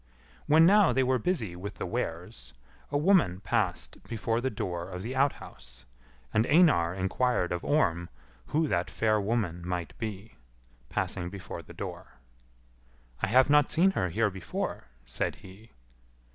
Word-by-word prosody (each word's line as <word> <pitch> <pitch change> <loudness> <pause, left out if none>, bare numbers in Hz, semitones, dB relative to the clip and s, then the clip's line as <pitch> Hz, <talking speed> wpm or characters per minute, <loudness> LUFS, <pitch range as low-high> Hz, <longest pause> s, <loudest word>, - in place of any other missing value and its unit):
When 160 +2 +6
now 200 +1 +6
they 135 - +3
were 130 0 +2
busy 115 - -1
with 100 +4 -7
the - - -4
wares, - - -4 0.4
a 145 - 0
woman 150 - +3
passed 95 - -1
before 115 +1 -1
the 130 - 0
door 90 -5 -4
of 90 0 -6
the 125 +4 -4
outhouse; 65 - -2 0.5
and 110 +2 +2
Einar 145 - +4
inquired 95 +1 0
of 90 -1 -2
Orm 85 - +1 0.4
who 155 +1 +1
that - - 0
fair 110 -2 +1
woman 100 -5 -1
might 90 -1 -4
be, 110 -1 -6 0.5
passing 85 -1 -2
before 100 0 -7
the - - -13
door. - - -7 1.1
"I - - +1
have 130 +5 +5
not 150 -1 +5
seen 185 +4 +4
her 90 - -1
here 105 +4 +1
before," 95 -7 -4 0.2
said - - -2
he. 100 +5 -15
110 Hz, 150 wpm, -29 LUFS, 90-135 Hz, 1.1 s, When